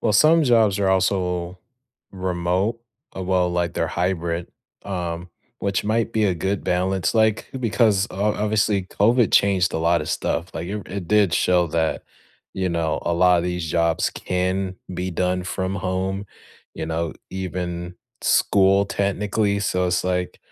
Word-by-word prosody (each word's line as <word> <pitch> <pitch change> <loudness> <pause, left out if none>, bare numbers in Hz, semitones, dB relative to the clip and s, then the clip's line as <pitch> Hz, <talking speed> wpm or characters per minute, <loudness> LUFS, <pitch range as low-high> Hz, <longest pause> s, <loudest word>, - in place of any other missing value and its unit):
well, 105 - +1
some 160 +5 +5
jobs 110 -6 +3
are 100 -1 +1
also 90 -2 0 0.5
remote. 95 +4 -1 0.3
Well, 90 -1 0
like, 85 -1 -1
they're 85 - 0
hybrid, 85 -1 -1 0.4
um, 90 -2 -4 0.3
which 100 -1 -1
might 115 +2 0
be 110 -1 +2
a 95 - +2
good 95 +3 -2
balance, 90 0 0
like 110 -1 +2
because, 110 -4 +2
o 105 +3 0
obviously, 105 -1 +1
COVID 115 +5 +2
changed 95 -3 +3
a - - -1
lot 85 +1 +2
of 75 - -5
stuff, 85 +3 -2
like, 85 - -4
it 105 - -3
re 105 - -6
it 90 -4 -5
did 105 -4 +3
show 90 -1 +3
that, 80 0 -1 0.5
you 95 -1 -1
know, 85 -2 -1
a 85 - -1
lotta 90 0 +4
these 90 -2 -3
jobs 85 0 +1
can 95 +1 -2 0.2
be 90 +1 -3
done 90 +1 0
from 95 +1 -3
home, 95 +1 -2 0.5
you - - -4
know, 80 0 -2 0.2
even 90 -1 -4 0.3
school 100 0 +4
technically. 100 +1 0
So 90 -2 0
it's, 90 +1 0
like, 90 -1 -2
95 Hz, 155 wpm, -22 LUFS, 90-100 Hz, 0.5 s, some